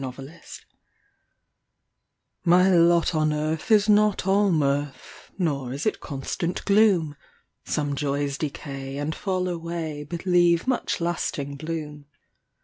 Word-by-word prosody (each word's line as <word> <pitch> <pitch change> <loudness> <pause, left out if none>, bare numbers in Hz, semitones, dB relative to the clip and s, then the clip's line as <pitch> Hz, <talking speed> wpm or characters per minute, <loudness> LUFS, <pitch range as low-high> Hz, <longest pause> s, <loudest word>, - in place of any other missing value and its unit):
MY 130 - -3
LOT 135 +6 -11 1.8
My 180 +2 +5
lot 170 0 +4
on 155 -1 +1
earth 155 +6 -2
is 210 -2 +5
not 210 -2 +3
all 200 +1 +3
mirth, 140 -3 -2
Nor 140 -9 -1
is 140 - -5
it 215 - 0
constant 155 +5 -4
gloom; 200 -8 +3 0.5
Some 145 -1 -1
joys 140 0 -2
decay 135 -2 -5
and 145 +2 -2
fall 185 +1 -2
away, 165 -3 -4
But 170 +4 -7
leave 175 -2 +3
much 255 -8 -1
lasting 150 -4 -2
bloom. 150 -2 -6
160 Hz, 125 wpm, -24 LUFS, 145-180 Hz, 1.8 s, My